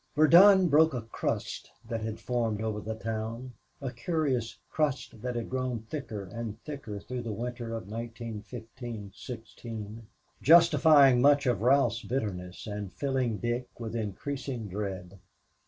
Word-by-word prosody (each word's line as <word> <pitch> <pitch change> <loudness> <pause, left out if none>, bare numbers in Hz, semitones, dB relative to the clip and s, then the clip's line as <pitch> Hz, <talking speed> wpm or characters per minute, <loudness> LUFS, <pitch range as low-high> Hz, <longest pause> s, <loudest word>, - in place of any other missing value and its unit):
Verdun 180 +5 +8
broke 155 -1 +5
a 120 - -3
crust 115 - -3 0.2
that 115 -1 -3
had 110 0 -4
formed 115 -4 -1
over 110 -1 -2
the 110 +1 -4
town; 115 +3 -4 0.3
a 135 -2 -3
curious 135 - -1
crust 150 -3 0
which 125 +3 -5
had 120 -1 -3
grown 130 -2 -2
thicker 125 -9 -4
and 110 +2 -6
thicker 135 -9 -6
through 125 +4 -5
the 115 -2 -4
winter 120 +1 -4
of 110 -4 -6
1915 115 0 -7
16, 115 -2 -8 0.3
justifying 150 -5 +7
much 145 +1 +5
of 125 -4 +1
Ralph's 125 -2 +3
bitterness 95 -8 -4
and 105 -2 -5
filling 130 -5 -1
Dick 120 +2 -2
with 115 -1 -5
increasing 120 +2 -4
dread. 95 -2 -5
120 Hz, 140 wpm, -29 LUFS, 110-135 Hz, 0.3 s, Verdun